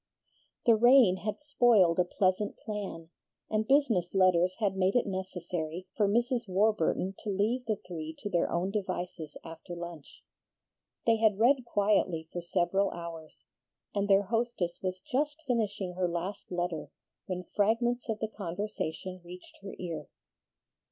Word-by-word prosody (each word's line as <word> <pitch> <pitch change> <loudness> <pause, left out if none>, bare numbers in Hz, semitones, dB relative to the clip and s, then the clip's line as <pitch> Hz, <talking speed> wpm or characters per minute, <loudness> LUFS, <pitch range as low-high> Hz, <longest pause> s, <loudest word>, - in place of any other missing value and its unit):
The 230 - +7
rain 240 -4 +6
had 210 +3 -4
spoiled 235 - +4
a - - +6
pleasant 185 +3 0
plan, 195 -6 -6 0.4
and 215 0 +1
business 230 - +2
letters 185 -1 +4
had 200 -4 +1
made 190 +2 +2
it 245 - +3
necessary 180 -3 -4
for 210 -3 +3
Mrs. 240 +2 +1
Warburton 195 -1 +1
to 215 - -5
leave 215 +6 0
the 215 - +2
three 160 -3 -6
to - - -6
their 175 -4 +1
own 180 +3 0
devices 180 -6 -4
after 165 +2 -8
lunch. 170 -3 -9 0.8
They 230 -1 +4
had 215 -2 +3
read 250 +3 +4
quietly 200 -7 +1
for 175 - -3
several 180 +3 +1
hours, 165 -3 -9 0.5
and 200 0 0
their 195 0 +6
hostess 225 -4 -1
was 185 -1 -2
just 295 +6 -1
finishing 205 -7 -1
her 180 0 0
last 175 +4 -4
letter 175 -3 -2 0.4
when 180 -1 -3
fragments 235 +4 +1
of 220 - 0
the 220 - -2
conversation 185 -2 -5
reached 180 +1 -12
her 195 0 -8
ear. 170 -3 -5
195 Hz, 145 wpm, -30 LUFS, 175-220 Hz, 0.8 s, The